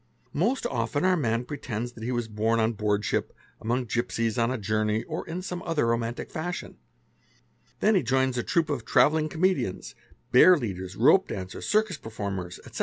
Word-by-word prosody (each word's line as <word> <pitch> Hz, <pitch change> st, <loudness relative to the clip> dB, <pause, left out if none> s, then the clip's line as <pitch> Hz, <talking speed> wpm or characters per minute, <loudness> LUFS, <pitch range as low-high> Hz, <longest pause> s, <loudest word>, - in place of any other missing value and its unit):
Most 225 Hz, -, 0 dB
often 125 Hz, +5 st, -1 dB
our 185 Hz, 0 st, +4 dB
man 120 Hz, -6 st, 0 dB
pretend: 120 Hz, -5 st, -4 dB
that 120 Hz, -2 st, -13 dB
he 120 Hz, -, -2 dB
was 120 Hz, -2 st, -1 dB
born 110 Hz, +1 st, 0 dB
on 110 Hz, +1 st, +2 dB
boardship, 105 Hz, -1 st, -1 dB, 0.3 s
among 120 Hz, +3 st, -1 dB
gipsies, 115 Hz, -1 st, -1 dB
on 115 Hz, 0 st, +2 dB
a 130 Hz, -, -1 dB
journey, 110 Hz, +1 st, 0 dB
or -, -, -5 dB
in 180 Hz, +3 st, -4 dB
some 180 Hz, -1 st, -4 dB
other 165 Hz, -7 st, 0 dB
romantic 115 Hz, 0 st, -2 dB
fashion; 175 Hz, +3 st, -5 dB, 1.0 s
then 215 Hz, -, +4 dB
he 190 Hz, -, +4 dB
joins 130 Hz, +1 st, +1 dB
a 120 Hz, -, 0 dB
troup 160 Hz, +4 st, 0 dB
of 145 Hz, -, -2 dB
travelling 155 Hz, +1 st, +3 dB
comedians 175 Hz, -, 0 dB, 0.4 s
bearleaders, 105 Hz, -, +4 dB
rope -, -, +5 dB
dancers, 95 Hz, -1 st, -6 dB
circus 215 Hz, -5 st, +2 dB
performers, 100 Hz, -6 st, -5 dB
etc. -, -, -8 dB
120 Hz, 170 wpm, -27 LUFS, 110-155 Hz, 1.0 s, rope